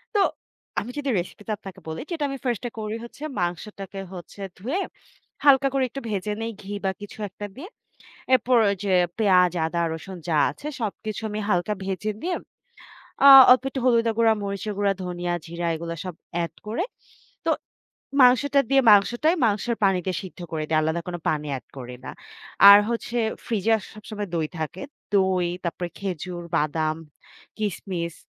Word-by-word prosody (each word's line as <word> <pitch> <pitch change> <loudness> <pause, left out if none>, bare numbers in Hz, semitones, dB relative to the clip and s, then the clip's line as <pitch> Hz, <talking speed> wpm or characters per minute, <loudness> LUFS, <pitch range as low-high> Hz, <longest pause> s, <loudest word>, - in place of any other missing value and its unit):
তো 405 - +5 0.6
আমি 240 - -7
যদি 285 - -2
রেসিপি 180 +4 -7
টা 215 - 0
আপনাকে 195 -2 -10
বলি, 160 - -4
'যেটা 320 -3 -2
আমি 275 - -4
ফার্স্ট 240 -4 -1
এ - - -30
করি 215 +1 -3
হচ্ছে 235 +5 -11 0.2
মাংসটাকে 195 +2 -4
হচ্ছে 180 +2 -10 0.2
ধুয়ে, 260 - -2 0.7
হালকা 275 -1 +6
করে 270 -1 +2
একটু 275 +3 -6
ভেজে 210 0 -2
নেই 225 0 -2
ঘি 200 +1 -7
বা, 190 - +2
কিছু 205 - -9
একটা 205 +2 -7
দিয়ে। 325 +9 -9 0.7
এরপর 250 0 +3
ওই 200 - -1
যে 195 - +1 0.3
পেঁয়াজ, 180 -4 +4
আদা, 170 +1 -1
রসুন 185 +3 -8
যা 160 - +2
আছে - - -11
সবকিছু 215 0 -4
আমি 210 - -3
হালকা 180 +3 +1
ভেজে 195 +3 -2
দিয়ে 355 +1 -1 0.9
আ - - +11 0.2
অল্প 255 +1 +7
একটু 270 - -4
হলুদ 230 -2 +4
গুঁড়া, 225 -1 +5
মরিচের 200 +1 -3
গুঁড়া, 200 -1 +3
ধনিয়া, 175 -1 -2
জিরা 170 +1 -4
এগুলো 165 +1 -5
সব 185 -2 -5 0.3
এড 170 - -7
করে। 235 - -1 0.6
তো - - +3 0.7
মাংসটা 270 +3 +5
দিয়ে 275 0 +5
মাংসটাই 240 - +4
মাংস 210 -2 0 0.2
পানি 195 -2 +4
দিয়ে 185 - -1
সিদ্ধ 185 -1 -10
করে 155 -1 -2
দেই। 160 - +3
আলাদা 160 +2 0
কোন 175 - -3
পানি 150 -1 0
এড - - -19
করি 125 -1 -7
না।' - - -6 0.6
আর 200 - +11
হচ্ছে 235 +1 -2 0.3
ফ্রিজে 225 0 +2 0.2
সবসময় 210 -1 -6
দই 160 -2 0
থাকে। 160 +4 -4 0.3
দই, 190 -2 +3 0.2
তারপরে 175 +1 -3
খেজুর, 180 -2 -4
বাদাম, 155 +1 0 0.6
কিসমিস 185 -5 -3
200 Hz, 170 wpm, -24 LUFS, 175-230 Hz, 0.9 s, আ